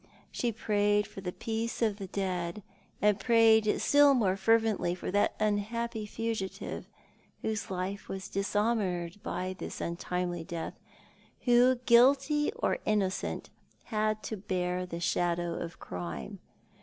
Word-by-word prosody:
She 240 Hz, -, -1 dB
prayed 205 Hz, -1 st, +1 dB
for 210 Hz, -2 st, -10 dB
the 180 Hz, -1 st, -3 dB
peace 225 Hz, +4 st, -3 dB
of 215 Hz, -4 st, +1 dB
the 195 Hz, -2 st, -6 dB
dead, 185 Hz, 0 st, -3 dB, 0.4 s
and 210 Hz, -1 st, +4 dB
prayed 220 Hz, -1 st, +4 dB
still 285 Hz, -1 st, +6 dB
more 195 Hz, -7 st, +2 dB
fervently 215 Hz, -3 st, +2 dB
for 180 Hz, -, -5 dB
that 205 Hz, +1 st, +2 dB
unhappy 215 Hz, +2 st, -1 dB
fugitive 225 Hz, -3 st, -4 dB, 0.5 s
whose 220 Hz, -1 st, -2 dB
life 190 Hz, +2 st, -4 dB
was 190 Hz, 0 st, -5 dB
dishonoured 200 Hz, -3 st, -1 dB
by 185 Hz, +1 st, -3 dB
this -, -, -6 dB
untimely 175 Hz, 0 st, -2 dB
death, 165 Hz, 0 st, -5 dB, 0.7 s
who, 245 Hz, +1 st, +5 dB
guilty 275 Hz, -, +5 dB
or 475 Hz, -, 0 dB
innocent, 200 Hz, -3 st, -1 dB, 0.3 s
had 215 Hz, -1 st, -1 dB
to 220 Hz, -, -4 dB
bear 180 Hz, -2 st, -2 dB
the 170 Hz, -1 st, -5 dB
shadow 175 Hz, 0 st, 0 dB
of 170 Hz, 0 st, -5 dB
crime. 85 Hz, -7 st, -6 dB
205 Hz, 130 wpm, -30 LUFS, 180-225 Hz, 0.7 s, still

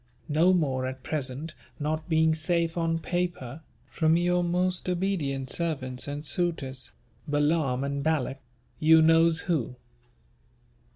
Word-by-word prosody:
No 160 Hz, +5 st, +4 dB
more 135 Hz, -8 st, +1 dB
at 130 Hz, 0 st, -7 dB
present 145 Hz, +2 st, -3 dB, 0.3 s
not 155 Hz, +3 st, -3 dB
being 160 Hz, 0 st, +3 dB
safe 165 Hz, +1 st, 0 dB
on 165 Hz, -1 st, 0 dB
paper, 165 Hz, -6 st, -3 dB, 0.2 s
from 160 Hz, 0 st, +2 dB
your 175 Hz, 0 st, +2 dB
most 180 Hz, +1 st, 0 dB
obedient 165 Hz, -8 st, -1 dB
servants 135 Hz, -7 st, -3 dB
and 145 Hz, +1 st, -5 dB
suitors 135 Hz, -5 st, -1 dB, 0.4 s
BALAAM 145 Hz, -3 st, +1 dB
AND 140 Hz, 0 st, -2 dB
BALAK 140 Hz, -4 st, 0 dB, 0.4 s
you 160 Hz, +1 st, +6 dB
knows 165 Hz, 0 st, +4 dB
who. 150 Hz, -8 st, -1 dB
160 Hz, 120 wpm, -27 LUFS, 140-170 Hz, 0.4 s, you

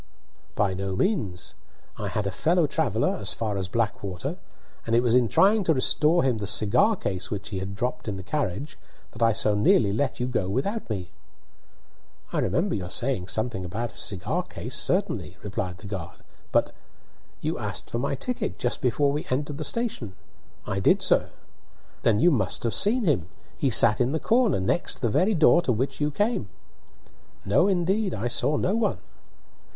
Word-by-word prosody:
"By 100 Hz, -2 st, +1 dB
no 95 Hz, 0 st, -3 dB
means. 105 Hz, -, -1 dB, 0.4 s
I -, -, -4 dB
had 105 Hz, -, -2 dB
a 100 Hz, -, -1 dB
fellow 165 Hz, -, +2 dB
traveller 130 Hz, -7 st, 0 dB
as 100 Hz, 0 st, +1 dB
far 110 Hz, -3 st, -2 dB
as 95 Hz, -2 st, -2 dB
Blackwater, 100 Hz, -4 st, -3 dB, 0.5 s
and 115 Hz, -, +2 dB
it 120 Hz, -, +4 dB
was 120 Hz, -2 st, +2 dB
in 125 Hz, -1 st, +4 dB
trying 200 Hz, -, +4 dB
to 160 Hz, -, +3 dB
restore 155 Hz, +6 st, +3 dB
him 125 Hz, -4 st, +1 dB
the 100 Hz, -, -4 dB
cigar 110 Hz, -, +3 dB
case 95 Hz, -, -4 dB
which 100 Hz, -2 st, -5 dB
he 95 Hz, -, -4 dB
had 95 Hz, +1 st, -5 dB
dropped 125 Hz, +2 st, -3 dB
in 105 Hz, -, -2 dB
the 95 Hz, -, -7 dB
carriage 140 Hz, -, -3 dB, 0.3 s
that 115 Hz, -, -12 dB
I 115 Hz, 0 st, +5 dB
so 105 Hz, -1 st, +2 dB
nearly 105 Hz, 0 st, +3 dB
let 130 Hz, +5 st, -1 dB
you 125 Hz, -, 0 dB
go 125 Hz, -6 st, -1 dB
on 95 Hz, -, -3 dB
without 200 Hz, -, -2 dB
me." 95 Hz, -5 st, -4 dB, 1.2 s
"I -, -, +1 dB
remember -, -, 0 dB
your 90 Hz, -2 st, -3 dB
saying 120 Hz, -7 st, -2 dB
something 110 Hz, -1 st, -1 dB
about 105 Hz, +5 st, -4 dB
a -, -, -12 dB
cigar 95 Hz, -4 st, -2 dB
case, -, -, -6 dB
certainly," 90 Hz, -, 0 dB
replied 95 Hz, -3 st, -4 dB
the 90 Hz, -, -13 dB
guard; 95 Hz, -4 st, -7 dB, 0.3 s
"but -, -, +2 dB, 0.4 s
" -, -, -34 dB
"You -, -, -2 dB
asked -, -, -4 dB
for 115 Hz, -, -1 dB
my 140 Hz, +2 st, -1 dB
ticket 250 Hz, -, -3 dB
just 120 Hz, -, -1 dB
before 140 Hz, +3 st, +2 dB
we 150 Hz, +2 st, -3 dB
entered 145 Hz, +3 st, -2 dB
station." 220 Hz, -, -2 dB, 0.5 s
"I 95 Hz, -1 st, -2 dB
did, -, -, +3 dB
sir." -, -, +3 dB, 0.7 s
"Then 110 Hz, -3 st, +3 dB
you 175 Hz, -, +5 dB
must 110 Hz, -, 0 dB
have 115 Hz, -, 0 dB
seen 235 Hz, +4 st, +3 dB
him. 125 Hz, -, +1 dB, 0.3 s
He 135 Hz, -, 0 dB
sat 115 Hz, -1 st, +5 dB
in 125 Hz, +3 st, +1 dB
the 160 Hz, -, 0 dB
corner 230 Hz, -, +2 dB
next 95 Hz, -, -1 dB
the 120 Hz, -, +3 dB
very 190 Hz, -, +2 dB
door 165 Hz, +1 st, +5 dB
to 130 Hz, -, 0 dB
which 130 Hz, +6 st, -2 dB
you 145 Hz, -, +2 dB
came." 205 Hz, -, -1 dB, 1.0 s
"No, 125 Hz, -, +3 dB
indeed; 190 Hz, +2 st, +1 dB
I 110 Hz, +4 st, -2 dB
saw 150 Hz, +5 st, +2 dB
no 190 Hz, -, 0 dB
one." 225 Hz, -1 st, +1 dB
120 Hz, 190 wpm, -26 LUFS, 100-155 Hz, 1.2 s, I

